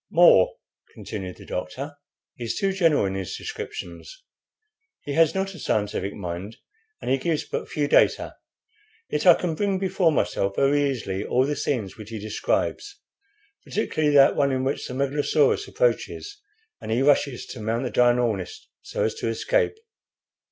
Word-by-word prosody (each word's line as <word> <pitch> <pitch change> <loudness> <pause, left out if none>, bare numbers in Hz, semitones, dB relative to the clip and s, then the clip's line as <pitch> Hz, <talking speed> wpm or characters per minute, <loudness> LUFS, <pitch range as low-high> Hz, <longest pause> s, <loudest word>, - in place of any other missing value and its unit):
"More," 170 - +6 0.4
continued 95 -4 -6
the - - -13
doctor, 135 +12 -5 0.4
"is 120 -3 -4
too 195 -2 0
general 165 - +3
in 95 - -2
his 95 -1 -4
descriptions. 445 +3 -8 0.8
He 145 - -4
has 165 +2 +4
not 195 0 -1
a 180 - -11
scientific 105 -5 -1
mind, 90 +3 -6 0.5
and - - -1
he 135 - +2
gives 160 +2 -1
but - - -5
few 145 -1 -1
data; - - +3 0.8
yet - - 0
I - - +10
can 175 -3 -2
bring 195 +3 0
before 185 -3 +2
myself 100 -9 0
very 140 +1 +3
easily 100 -7 -3
all 130 +1 +2
the 145 +1 -1
scenes 115 -12 -2
which 110 -1 -10
he 115 - -5
describes, 110 - -2 0.6
particularly 155 -8 0
that 140 -1 +7
one 140 -1 +2
in 130 0 -1
which 135 +2 -2
the 125 - -6
megalosaurus 145 - +1
approaches, 420 -4 -1 0.4
and - - -7
he 120 +4 +1
rushes 140 -3 +2
to 125 - -8
mount 115 +3 -1
the 125 - -3
dinoris 120 -6 +1
so - - -3
as 110 - 0
to - - -2
escape. 445 - +1
140 Hz, 160 wpm, -24 LUFS, 110-175 Hz, 0.8 s, I